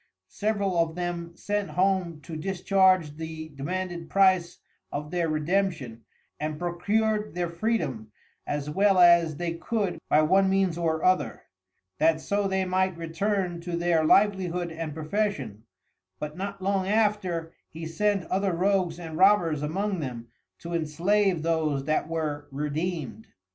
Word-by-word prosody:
Several 200 Hz, -4 st, -1 dB
of 165 Hz, -1 st, +1 dB
them 175 Hz, -1 st, -4 dB
sent 205 Hz, -1 st, -2 dB
home 180 Hz, -4 st, 0 dB
to 160 Hz, -, -8 dB
discharge 185 Hz, -2 st, +2 dB
the 160 Hz, 0 st, -6 dB
demanded 170 Hz, +3 st, -4 dB
price 185 Hz, -3 st, +3 dB, 0.3 s
of 150 Hz, +1 st, -5 dB
their 170 Hz, -2 st, 0 dB
Redemption, 155 Hz, -7 st, -1 dB, 0.3 s
and 155 Hz, 0 st, -3 dB
procur'd 210 Hz, +4 st, 0 dB
their 175 Hz, -1 st, -2 dB
Freedom, 170 Hz, -, -2 dB, 0.4 s
as 145 Hz, 0 st, -2 dB
well 195 Hz, +5 st, +3 dB
as 170 Hz, -3 st, +6 dB
they 175 Hz, -1 st, -2 dB
could 180 Hz, 0 st, -2 dB
by 155 Hz, -, +5 dB
one 190 Hz, +4 st, +4 dB
means 190 Hz, -3 st, +2 dB
or 160 Hz, -2 st, -1 dB
other, 150 Hz, -11 st, +1 dB, 0.6 s
that 160 Hz, 0 st, +3 dB
so 200 Hz, +4 st, 0 dB
they 190 Hz, 0 st, 0 dB
might 185 Hz, -1 st, 0 dB
return 175 Hz, +1 st, -2 dB
to 170 Hz, 0 st, -3 dB
their 170 Hz, -2 st, +2 dB
Livelihood 180 Hz, -1 st, +2 dB
and 160 Hz, -2 st, -5 dB
profession, 155 Hz, -, -2 dB, 0.5 s
but 150 Hz, 0 st, -6 dB
not 195 Hz, 0 st, -5 dB
long 195 Hz, -1 st, 0 dB
after 200 Hz, -6 st, 0 dB, 0.2 s
he 160 Hz, +1 st, -8 dB
sent 200 Hz, +3 st, 0 dB
other 190 Hz, -1 st, +1 dB
Rogues 180 Hz, -1 st, +1 dB
and 165 Hz, -2 st, -7 dB
Robbers 180 Hz, -6 st, +4 dB
among 190 Hz, +6 st, -1 dB
them 120 Hz, -5 st, -6 dB, 0.3 s
to 170 Hz, 0 st, -6 dB
enslave 170 Hz, +3 st, +1 dB
those 155 Hz, -4 st, 0 dB
that 155 Hz, 0 st, 0 dB
were 155 Hz, -3 st, -3 dB
Redeemed. 150 Hz, -, -3 dB
170 Hz, 140 wpm, -27 LUFS, 155-195 Hz, 0.6 s, as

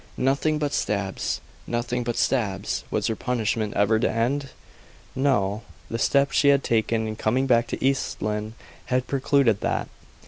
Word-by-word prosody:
Nothing 140 Hz, +4 st, +1 dB
but 145 Hz, -1 st, -2 dB
stabs; 100 Hz, -2 st, -1 dB, 0.3 s
nothing 120 Hz, +1 st, -1 dB
but 120 Hz, -1 st, -3 dB
stabs! 100 Hz, -6 st, 0 dB
Was 105 Hz, -, -1 dB
her 110 Hz, -, 0 dB
punishment 110 Hz, -3 st, -1 dB
ever 105 Hz, +2 st, +3 dB
to -, -, +2 dB
end? 135 Hz, +5 st, 0 dB, 0.7 s
No. 110 Hz, -7 st, +1 dB, 0.3 s
The 115 Hz, -, -2 dB
step 140 Hz, +3 st, +3 dB
she 145 Hz, -, +3 dB
had 140 Hz, -1 st, +5 dB
taken 110 Hz, 0 st, +1 dB
in 110 Hz, -, -4 dB
coming 125 Hz, +5 st, +1 dB
back 120 Hz, -3 st, +3 dB
to -, -, -3 dB
East 135 Hz, -1 st, 0 dB
Lynne 105 Hz, +1 st, -3 dB, 0.3 s
had 125 Hz, 0 st, 0 dB
precluded 135 Hz, -5 st, +2 dB
that. -, -, -1 dB
120 Hz, 160 wpm, -25 LUFS, 110-135 Hz, 0.7 s, had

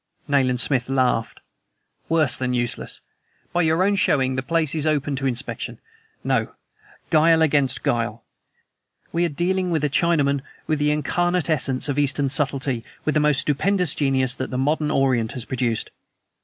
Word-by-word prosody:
Nayland 130 Hz, -3 st, +2 dB
Smith 130 Hz, -1 st, +1 dB
laughed. 130 Hz, -4 st, 0 dB, 0.7 s
"Worse 155 Hz, -5 st, +3 dB
than 125 Hz, -1 st, -2 dB
useless! 120 Hz, -1 st, -3 dB, 0.5 s
By 175 Hz, -, +2 dB
your 160 Hz, +2 st, +2 dB
own 200 Hz, +1 st, +2 dB
showing, 130 Hz, -9 st, +1 dB
the 130 Hz, -, -1 dB
place 160 Hz, +1 st, 0 dB
is 155 Hz, -1 st, 0 dB
open 145 Hz, -2 st, 0 dB
to 135 Hz, +1 st, -1 dB
inspection. 125 Hz, 0 st, -4 dB, 0.5 s
No; -, -, -1 dB, 0.6 s
guile 160 Hz, 0 st, +5 dB
against 140 Hz, -4 st, +1 dB
guile! 115 Hz, -1 st, -1 dB, 0.9 s
We 170 Hz, +1 st, +2 dB
are -, -, 0 dB
dealing 180 Hz, +4 st, -1 dB
with 160 Hz, -3 st, 0 dB
a 150 Hz, -, 0 dB
Chinaman, 145 Hz, -4 st, +2 dB, 0.2 s
with 155 Hz, -1 st, -1 dB
the 150 Hz, 0 st, +2 dB
incarnate 175 Hz, +3 st, 0 dB
essence 135 Hz, -2 st, +1 dB
of 145 Hz, 0 st, -1 dB
Eastern 140 Hz, -1 st, +2 dB
subtlety, 135 Hz, -3 st, 0 dB, 0.2 s
with 155 Hz, -, +1 dB
the 155 Hz, -, +2 dB
most 150 Hz, -2 st, +2 dB
stupendous 180 Hz, +3 st, +1 dB
genius 130 Hz, -3 st, +1 dB
that 130 Hz, -, -4 dB
the 125 Hz, -, -3 dB
modern 150 Hz, +3 st, 0 dB
Orient 130 Hz, -6 st, +1 dB
has 125 Hz, -, -4 dB
produced." 120 Hz, -3 st, -2 dB
145 Hz, 160 wpm, -22 LUFS, 130-160 Hz, 0.9 s, guile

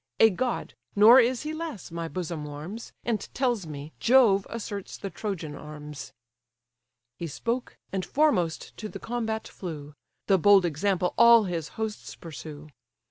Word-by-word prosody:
A 225 Hz, -, +7 dB
god, 245 Hz, +6 st, -2 dB, 0.2 s
nor 220 Hz, +5 st, +9 dB
is 250 Hz, +1 st, +2 dB
he 305 Hz, +1 st, -3 dB
less, 315 Hz, -, -6 dB
my 165 Hz, 0 st, -4 dB
bosom 170 Hz, -3 st, -4 dB
warms, 155 Hz, +10 st, -7 dB
And 230 Hz, -3 st, 0 dB, 0.2 s
tells 240 Hz, -9 st, 0 dB
me, 150 Hz, 0 st, -7 dB
Jove 230 Hz, -6 st, +5 dB
asserts 205 Hz, -4 st, -6 dB
the 195 Hz, -, -6 dB
Trojan 175 Hz, -7 st, -4 dB
arms." 150 Hz, -1 st, -9 dB, 1.1 s
He 170 Hz, -, -3 dB
spoke, 235 Hz, -, -3 dB, 0.2 s
and 190 Hz, -1 st, -1 dB
foremost 225 Hz, -, +1 dB
to 215 Hz, -, -6 dB
the -, -, -7 dB
combat 225 Hz, -2 st, -3 dB
flew: 150 Hz, -5 st, -7 dB, 0.3 s
The 195 Hz, -2 st, +4 dB
bold 200 Hz, 0 st, +6 dB
example 180 Hz, +3 st, 0 dB
all 235 Hz, -1 st, +8 dB
his 170 Hz, -5 st, -3 dB
hosts 220 Hz, -1 st, -4 dB
pursue. 155 Hz, -2 st, -9 dB
195 Hz, 145 wpm, -27 LUFS, 160-230 Hz, 1.1 s, nor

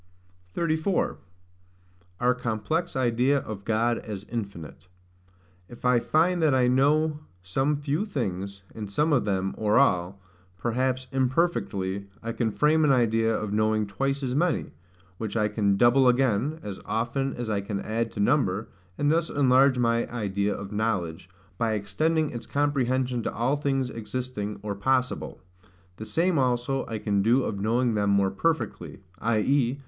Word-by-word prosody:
34. 165 Hz, +3 st, 0 dB, 1.0 s
Our 125 Hz, +1 st, +3 dB
complex 125 Hz, +8 st, -2 dB
idea 130 Hz, +2 st, +2 dB
of 110 Hz, -6 st, -5 dB
God 115 Hz, +2 st, +1 dB
as 105 Hz, -3 st, -7 dB
infinite. 95 Hz, -7 st, -6 dB, 0.8 s
If 120 Hz, +1 st, -11 dB
I 125 Hz, -1 st, +4 dB
find 170 Hz, +7 st, +2 dB
that 150 Hz, -4 st, +3 dB
I 125 Hz, -1 st, +3 dB
know 150 Hz, +4 st, +2 dB, 0.2 s
some 135 Hz, +11 st, 0 dB
few 150 Hz, +8 st, -2 dB
things, 100 Hz, -, -4 dB
and 105 Hz, -3 st, -7 dB
some 150 Hz, +9 st, +2 dB
of 125 Hz, -, +2 dB
them, 95 Hz, -2 st, -1 dB
or 105 Hz, -1 st, +2 dB
all, 95 Hz, -7 st, +2 dB, 0.4 s
perhaps 130 Hz, +4 st, -1 dB
imperfectly, 125 Hz, -, 0 dB, 0.2 s
I 115 Hz, -, -3 dB
can 115 Hz, -1 st, -1 dB
frame 155 Hz, +6 st, +3 dB
an 150 Hz, -, +4 dB
idea 115 Hz, -3 st, +2 dB
of 110 Hz, -2 st, -2 dB
knowing 110 Hz, 0 st, +2 dB
twice 135 Hz, +7 st, -2 dB
as 125 Hz, -1 st, -1 dB
many; 165 Hz, +4 st, 0 dB, 0.5 s
which 110 Hz, 0 st, -3 dB
I 105 Hz, -1 st, +2 dB
can 105 Hz, -2 st, +1 dB
double 125 Hz, +4 st, +5 dB
again, 130 Hz, +4 st, +2 dB
as 100 Hz, -2 st, -6 dB
often 125 Hz, +4 st, -1 dB
as 120 Hz, -1 st, -4 dB
I 105 Hz, -2 st, 0 dB
can 100 Hz, 0 st, -4 dB
add 115 Hz, +2 st, -2 dB
to -, -, -7 dB
number; 110 Hz, -3 st, +1 dB, 0.3 s
and 145 Hz, 0 st, +2 dB
thus 165 Hz, +1 st, +1 dB
enlarge 135 Hz, -1 st, +4 dB
my 115 Hz, -1 st, +1 dB
idea 100 Hz, -3 st, -1 dB
of 100 Hz, +1 st, -7 dB
knowledge, 95 Hz, -6 st, -2 dB, 0.3 s
by 115 Hz, -1 st, +1 dB
extending 150 Hz, +10 st, 0 dB
its 120 Hz, -2 st, -7 dB
comprehension 130 Hz, -3 st, 0 dB
to -, -, -2 dB
all 120 Hz, +6 st, 0 dB
things 135 Hz, -3 st, -1 dB
existing, 115 Hz, -2 st, -4 dB
or 105 Hz, -1 st, -2 dB
possible. 125 Hz, +5 st, -1 dB, 0.6 s
The 110 Hz, -, -7 dB
same 165 Hz, -, +1 dB
also 125 Hz, +1 st, 0 dB
I 110 Hz, -, -3 dB
can 100 Hz, -2 st, 0 dB
do 120 Hz, +6 st, +3 dB
of 100 Hz, -4 st, -3 dB
knowing 115 Hz, +3 st, +1 dB
them 105 Hz, -1 st, +1 dB
more 100 Hz, -1 st, +3 dB
perfectly; 125 Hz, -, -2 dB, 0.2 s
i.e. 120 Hz, +4 st, +1 dB
120 Hz, 155 wpm, -26 LUFS, 105-135 Hz, 1.0 s, double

